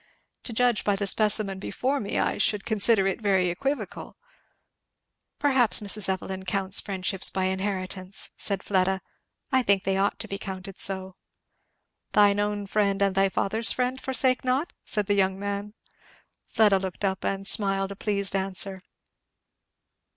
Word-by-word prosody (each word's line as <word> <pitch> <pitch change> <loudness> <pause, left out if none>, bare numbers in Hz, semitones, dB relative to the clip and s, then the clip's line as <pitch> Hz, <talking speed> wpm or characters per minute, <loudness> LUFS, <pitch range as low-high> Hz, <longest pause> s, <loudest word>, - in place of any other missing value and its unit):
"To - - -3
judge 240 -1 +2
by 205 - +2
the 200 +1 -2
specimen 205 -1 +2
before 265 +7 -2
me 205 - -3
I - - 0
should 210 -1 +1
consider 215 -2 +2
it 195 +3 -1
very 190 -3 +2
equivocal." 275 +11 -4 1.2
"Perhaps 265 -6 +4
Mrs. 205 -1 -1
Evelyn 190 0 -3
counts 190 +1 +2
friendships 190 -1 +1
by 190 - -2
inheritance," 190 0 -3
said 195 -2 -3
Fleda. 190 -1 +1 0.5
"I 260 -1 +4
think 200 -4 +2
they 195 -1 0
ought 200 +1 +1
to 220 - -6
be 195 -1 -5
counted 190 -1 -7
so." 190 -1 -1 1.0
"'Thine 205 -1 +5
own 205 0 -1
friend 200 -1 +1
and 200 -1 +2
thy 195 0 +3
father's 215 +3 0
friend 255 +1 -1
forsake 260 -1 +1
not'?" 260 +6 0
said 210 -2 -1
the 205 - +1
young 190 -1 +2
man. 200 +1 -4 0.7
Fleda 210 -3 +3
looked 190 +1 -4
up 190 -1 -1
and 195 0 -2
smiled 195 -2 +2
a - - -6
pleased 200 -1 -2
answer. 190 0 -2
200 Hz, 150 wpm, -26 LUFS, 190-210 Hz, 1.2 s, Thine